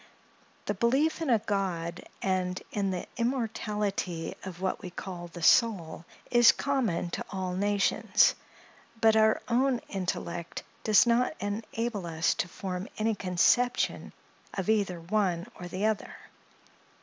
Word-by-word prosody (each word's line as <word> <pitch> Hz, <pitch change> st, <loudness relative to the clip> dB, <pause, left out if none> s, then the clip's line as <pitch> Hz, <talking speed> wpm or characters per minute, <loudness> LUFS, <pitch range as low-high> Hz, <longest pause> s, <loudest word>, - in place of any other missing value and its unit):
The 205 Hz, -, 0 dB
belief 265 Hz, -, +1 dB
in 320 Hz, -, -1 dB
a 235 Hz, -, +5 dB
God, 185 Hz, -5 st, -2 dB, 0.2 s
and 185 Hz, -1 st, 0 dB
in 200 Hz, -2 st, 0 dB
the 185 Hz, -1 st, -3 dB
immortality 210 Hz, -8 st, -2 dB
of 185 Hz, -2 st, -7 dB
what 190 Hz, 0 st, -2 dB
we 185 Hz, -, -6 dB
call 175 Hz, -1 st, -7 dB
the 170 Hz, 0 st, -9 dB
soul, 170 Hz, -7 st, +3 dB, 0.3 s
is 240 Hz, -1 st, +8 dB
common 235 Hz, -12 st, -1 dB
to -, -, -4 dB
all 185 Hz, -2 st, -3 dB
nations; 200 Hz, +1 st, +3 dB, 0.7 s
but 220 Hz, -1 st, +5 dB
our 220 Hz, 0 st, +4 dB
own 250 Hz, +1 st, +2 dB
intellect 175 Hz, -3 st, -4 dB, 0.2 s
does 215 Hz, 0 st, +6 dB
not 240 Hz, +5 st, +2 dB
enable 210 Hz, -1 st, -3 dB
us 160 Hz, 0 st, +1 dB
to -, -, -2 dB
form 185 Hz, +1 st, -5 dB
any 220 Hz, +1 st, +1 dB
conception 205 Hz, +6 st, +1 dB, 0.4 s
of 190 Hz, 0 st, -2 dB
either 200 Hz, -5 st, 0 dB
one 180 Hz, -1 st, 0 dB
or 180 Hz, -, -6 dB
the 185 Hz, +4 st, -2 dB
other. 215 Hz, -2 st, -1 dB
200 Hz, 135 wpm, -29 LUFS, 180-225 Hz, 0.7 s, is